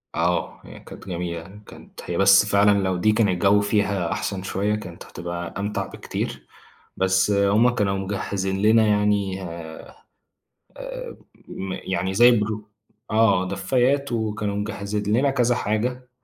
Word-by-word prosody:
آه، 85 0 -1
هي - - -12
كانت - - -13
جميلة 85 -1 -4
يعني، 100 +5 -14
كانت - - -13
هي 85 - -3
بس 95 +1 +6
فعلًا 100 0 +4
لو 95 -1 0
دي 110 +4 +3
كان 105 -1 +2
الجو 100 +3 +3
فيها 100 -4 0
أحسن 95 -2 -3
شوية، 100 +2 -1
كانت 90 -5 -8
هتبقى 85 0 -6
أمتع 100 0 -2
بكتير، - - -6 0.5
بس 95 +1 +2
هُم 100 +4 +4
كانوا 100 -5 0
مجهزين 95 0 -3
لنا 110 +1 +5
يعني، 105 -2 +1
آآ، 85 -2 -9 0.8
آآ - - -7 0.3
م 95 0 -5
يعني 95 0 -3
زي 120 +4 +7
برو 105 0 -4 0.4
آه، 110 -4 +3
دفايات، 130 +9 0
وكانوا 105 -3 -2
مجهزين 105 +1 -2
لنا 140 +2 +3
كذا 125 -3 +2
حاجة، 125 +5 -2
100 Hz, 145 wpm, -23 LUFS, 95-110 Hz, 0.8 s, زي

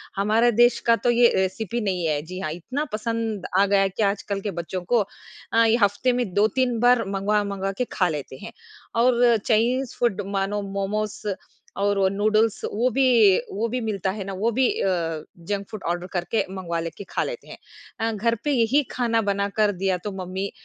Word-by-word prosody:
हमारे 220 +4 +3
देश 240 +2 +4
का 230 - +6
तो - - +5
ये 240 0 +5
रेसिपी 215 +5 -1
नहीं 185 -5 -1
है। 150 -1 0
जी 185 +4 -8
हाँ, 155 - -3
इतना 255 - -4
पसंद 225 -3 -2
आ 200 - +5
गया 200 0 +3
है 195 - +2
कि 205 +4 -2
आजकल 200 0 -1
के 205 - -3
बच्चों 175 +1 -4
को 235 +5 +2 0.5
अ, 230 - +5
ये 225 0 +4
हफ्ते 205 +6 +2
में 245 -7 -2
2-3 230 +4 +1
बार 245 0 +4
मँगवा-मँगवा 200 0 -1
के 250 - +1
खा 180 - +2
लेते 145 -4 -5
हैं - - -7 0.5
और 240 -1 +4
चाइनीज 245 +3 +1
फूड 215 -4 +1
मानो 195 +1 -1
मोमोस 200 +2 -3 0.6
और 200 0 +1
वो 190 - +4
नूडल्स 215 +2 +1
वो 235 +5 +2
भी 270 0 +4 0.5
वो 220 +4 -1
भी 250 - -2
मिलता 200 -4 -1
है 200 0 -5
ना 195 0 -6
वो 220 +5 0
भी 255 +2 +2
अ, 165 -4 -1 0.2
जंक 200 -1 -2
फूड 215 - -8
ऑर्डर 175 +1 -2
करके 180 +5 0
मँगवा 180 -3 -4
लेके 165 +4 -6
खा - - -1
लेते - - -6
हैं। - - -10 0.4
अ, 225 0 0
घर 225 +2 0
पे 295 - 0
यही 255 +2 +3
खाना 230 -2 +1
बना 200 -1 0
कर 210 -1 +4
दिया 190 -1 -1
तो 210 - -3
मम्मी 190 +1 -4
205 Hz, 200 wpm, -24 LUFS, 190-230 Hz, 0.6 s, का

